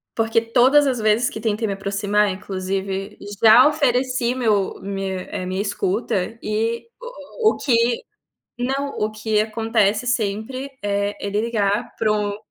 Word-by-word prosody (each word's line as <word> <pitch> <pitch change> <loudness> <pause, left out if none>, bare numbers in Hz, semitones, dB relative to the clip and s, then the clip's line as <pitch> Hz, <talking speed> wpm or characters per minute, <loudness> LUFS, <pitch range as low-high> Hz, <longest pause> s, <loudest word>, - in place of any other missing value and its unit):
porque 225 0 +2
todas 255 +5 +4
as 255 -3 0
vezes 215 +3 +2
que 220 - -7
tentei 220 0 -1
me 200 - -1
aproximar 200 +1 0
inclusive, 195 +1 -4 0.3
já 230 +5 +8
ofereci 255 -4 +1
meu 215 -6 0
minha, 195 -1 -4
eh, 185 - -4
minha 185 +1 -2
escuta 200 0 -2
e 225 - -2
o - - -1
o - - -5
o - - -10
que 250 - +1 0.8
não, 270 +3 -1
o 215 +1 0
que 215 0 -1
acontece 220 0 0
sempre 240 +4 -2
é 200 0 -1
ele 200 +1 -1
ligar 220 -1 -1
para 215 -1 +1
o 205 -1 -1
215 Hz, 150 wpm, -21 LUFS, 200-240 Hz, 0.8 s, já